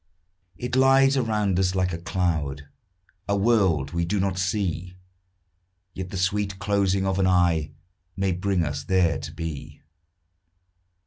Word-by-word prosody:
It 125 Hz, 0 st, -3 dB
lies 135 Hz, +1 st, +5 dB
around 105 Hz, -7 st, 0 dB
us 95 Hz, 0 st, +1 dB
like 90 Hz, -1 st, 0 dB
a 85 Hz, -, -4 dB
cloud, 80 Hz, -5 st, -2 dB, 0.6 s
A 100 Hz, -, +2 dB
world 95 Hz, -, +2 dB
we 85 Hz, 0 st, -1 dB
do 100 Hz, +4 st, -1 dB
not 95 Hz, -1 st, -1 dB
see; 90 Hz, -2 st, -2 dB, 1.0 s
Yet 95 Hz, -1 st, -6 dB
the 95 Hz, -, -5 dB
sweet 95 Hz, +1 st, -1 dB
closing 100 Hz, -1 st, +1 dB
of 95 Hz, 0 st, 0 dB
an 95 Hz, -, +3 dB
eye 85 Hz, -4 st, +2 dB, 0.5 s
May 95 Hz, -1 st, 0 dB
bring 90 Hz, 0 st, 0 dB
us 75 Hz, -1 st, -4 dB
there 90 Hz, -3 st, +2 dB
to 75 Hz, -, -7 dB
be. 80 Hz, -3 st, -7 dB
95 Hz, 140 wpm, -25 LUFS, 85-100 Hz, 1.0 s, lies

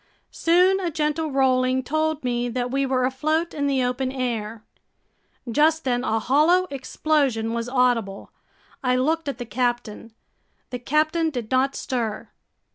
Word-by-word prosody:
Soon 365 Hz, +3 st, +3 dB
a 360 Hz, -3 st, -1 dB
gentle 310 Hz, 0 st, -1 dB
rolling 260 Hz, -1 st, +2 dB
told 310 Hz, +2 st, -1 dB
me 245 Hz, -1 st, -1 dB
that 245 Hz, +1 st, -3 dB
we 275 Hz, 0 st, 0 dB
were 255 Hz, -1 st, +1 dB
afloat 310 Hz, +6 st, -1 dB
in 285 Hz, -1 st, -1 dB
the 270 Hz, -2 st, +1 dB
open 250 Hz, +1 st, -1 dB
air. 230 Hz, -4 st, -3 dB, 0.8 s
Just 305 Hz, +6 st, +2 dB
then 245 Hz, -1 st, 0 dB
a 225 Hz, -3 st, 0 dB
hollow 305 Hz, +10 st, +3 dB
explosion 270 Hz, -4 st, 0 dB
was 235 Hz, +1 st, -3 dB
audible. 245 Hz, -6 st, 0 dB, 0.5 s
I 250 Hz, -1 st, +2 dB
looked 310 Hz, +4 st, 0 dB
at 275 Hz, -, -4 dB
the 245 Hz, -, -6 dB
captain. 240 Hz, -2 st, -2 dB, 0.6 s
The 250 Hz, -, -4 dB
captain 310 Hz, +5 st, +1 dB
did 245 Hz, -6 st, -6 dB
not 265 Hz, +1 st, +2 dB
stir. 235 Hz, -5 st, -3 dB
260 Hz, 145 wpm, -23 LUFS, 245-305 Hz, 0.8 s, Soon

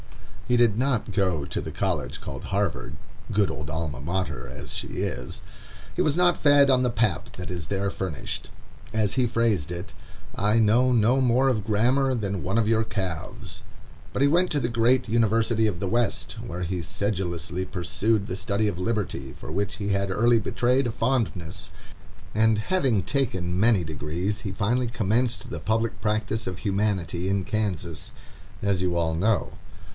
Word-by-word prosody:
He 125 Hz, -, +3 dB
did 115 Hz, -3 st, +4 dB
not 125 Hz, -3 st, 0 dB
go 90 Hz, -8 st, +1 dB
to 70 Hz, -, -3 dB
the -, -, -6 dB
college -, -, -2 dB
called -, -, -7 dB
Harvard, 100 Hz, -1 st, -2 dB, 0.3 s
good 100 Hz, -1 st, +2 dB
old 75 Hz, 0 st, -6 dB
Alma 80 Hz, -4 st, -3 dB
Mater 80 Hz, -4 st, -3 dB
as 70 Hz, +3 st, -7 dB
she -, -, -3 dB
is. 60 Hz, +1 st, -4 dB, 0.5 s
He -, -, +1 dB
was 150 Hz, +1 st, +2 dB
not 180 Hz, -1 st, +4 dB
fed 145 Hz, -1 st, +6 dB
on 130 Hz, -1 st, +4 dB
the 125 Hz, -, +2 dB
pap 110 Hz, -8 st, 0 dB
that 90 Hz, -, -7 dB
is 85 Hz, -4 st, -5 dB
there 100 Hz, +1 st, 0 dB
furnished. 95 Hz, -7 st, -4 dB, 0.4 s
As 110 Hz, -2 st, +1 dB
he 130 Hz, -2 st, +2 dB
phrased 115 Hz, -9 st, +1 dB
it, 90 Hz, +3 st, -6 dB, 0.4 s
"I 105 Hz, +2 st, +2 dB
know 115 Hz, +4 st, +4 dB
no 120 Hz, +3 st, +4 dB
more 130 Hz, +1 st, +3 dB
of 115 Hz, -6 st, +1 dB
grammar 125 Hz, +5 st, +2 dB
than 100 Hz, -5 st, -2 dB
one 95 Hz, +5 st, 0 dB
of 115 Hz, -2 st, +3 dB
your 110 Hz, 0 st, +3 dB
calves." 95 Hz, -7 st, -5 dB, 0.5 s
But 135 Hz, -, +1 dB
he -, -, +6 dB
went 175 Hz, +5 st, +3 dB
to 150 Hz, -, +2 dB
the 120 Hz, -, 0 dB
great 120 Hz, +2 st, +2 dB
university 115 Hz, 0 st, +2 dB
of 90 Hz, -5 st, -2 dB
the 95 Hz, -, -2 dB
West, 115 Hz, -1 st, 0 dB
where 90 Hz, +2 st, -4 dB
he 90 Hz, +1 st, -2 dB
sedulously 90 Hz, -1 st, -2 dB
pursued 95 Hz, +4 st, 0 dB
the 90 Hz, -, -3 dB
study 105 Hz, 0 st, 0 dB
of 95 Hz, -4 st, -2 dB
Liberty, 90 Hz, -, -2 dB
for -, -, -8 dB
which 100 Hz, +4 st, -1 dB
he 100 Hz, -1 st, -3 dB
had 100 Hz, -1 st, 0 dB
early 115 Hz, +4 st, +4 dB
betrayed 125 Hz, +4 st, +1 dB
a -, -, -1 dB
fondness, 115 Hz, -9 st, -1 dB, 0.7 s
and 110 Hz, 0 st, +4 dB
having 125 Hz, -, +1 dB
taken 95 Hz, -11 st, -1 dB
many 105 Hz, -2 st, +4 dB
degrees, 80 Hz, +7 st, -3 dB
he 100 Hz, -, -4 dB
finally 120 Hz, +6 st, 0 dB
commenced 115 Hz, +1 st, 0 dB
the -, -, -5 dB
public 115 Hz, +1 st, -1 dB
practice 110 Hz, +1 st, -1 dB
of 90 Hz, -1 st, -3 dB
Humanity 95 Hz, -3 st, 0 dB
in 100 Hz, -2 st, 0 dB
Kansas, 100 Hz, -6 st, -2 dB, 0.5 s
as 100 Hz, -3 st, +1 dB
you 90 Hz, -2 st, 0 dB
all 80 Hz, -1 st, +1 dB
know. 100 Hz, +6 st, +1 dB
105 Hz, 175 wpm, -26 LUFS, 90-115 Hz, 0.7 s, fed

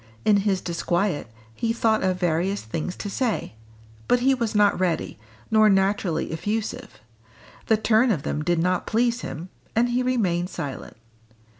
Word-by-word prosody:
In 210 Hz, -, +5 dB
his 195 Hz, -2 st, +1 dB
disquiet, 175 Hz, -, -1 dB, 0.3 s
he 225 Hz, -, -1 dB
thought 225 Hz, -2 st, +2 dB
of 185 Hz, -1 st, 0 dB
various 180 Hz, +3 st, 0 dB
things 160 Hz, +10 st, -4 dB
to -, -, -6 dB
say; 225 Hz, -, -2 dB, 0.5 s
but 245 Hz, -, +3 dB
he 270 Hz, +2 st, +4 dB
was 235 Hz, -4 st, -2 dB
not 205 Hz, -2 st, +4 dB
ready, 175 Hz, -, -1 dB, 0.3 s
nor 215 Hz, -1 st, +6 dB
naturally 195 Hz, -4 st, +1 dB
effusive; 220 Hz, -, -4 dB, 0.7 s
the 220 Hz, -, +4 dB
turn 220 Hz, +3 st, +3 dB
of 165 Hz, -11 st, 0 dB
them 150 Hz, -, -2 dB
did 175 Hz, +1 st, +1 dB
not 180 Hz, +2 st, 0 dB
please 240 Hz, +2 st, +1 dB
him; 170 Hz, +4 st, -6 dB, 0.3 s
and 240 Hz, +2 st, +3 dB
he 245 Hz, +1 st, +1 dB
remained 190 Hz, -9 st, 0 dB
silent. 145 Hz, -, -6 dB
200 Hz, 155 wpm, -24 LUFS, 175-225 Hz, 0.7 s, nor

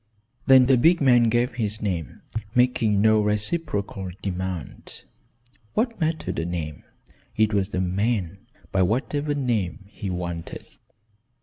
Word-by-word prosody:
Then 130 Hz, -1 st, +8 dB
the 130 Hz, 0 st, +4 dB
big 170 Hz, +8 st, +4 dB
man 120 Hz, -4 st, +5 dB
gave 120 Hz, +2 st, +1 dB
his 110 Hz, -2 st, -2 dB
name, 85 Hz, -, -4 dB, 0.3 s
making 120 Hz, -5 st, +3 dB
no 110 Hz, 0 st, +5 dB
reciprocal 105 Hz, -, -1 dB
demand. 95 Hz, -4 st, -5 dB, 0.7 s
What 230 Hz, -3 st, 0 dB
mattered 160 Hz, -, -1 dB
a 80 Hz, -, -2 dB
name? 80 Hz, -4 st, -5 dB, 0.5 s
It 110 Hz, 0 st, +3 dB
was 100 Hz, -1 st, +1 dB
the 95 Hz, -, -2 dB
man, 95 Hz, 0 st, -1 dB, 0.3 s
by 95 Hz, -, +2 dB
whatever 145 Hz, +9 st, 0 dB
name, 105 Hz, -, -1 dB
he 100 Hz, -1 st, -6 dB
wanted. 85 Hz, -2 st, -5 dB
105 Hz, 125 wpm, -24 LUFS, 95-125 Hz, 0.7 s, Then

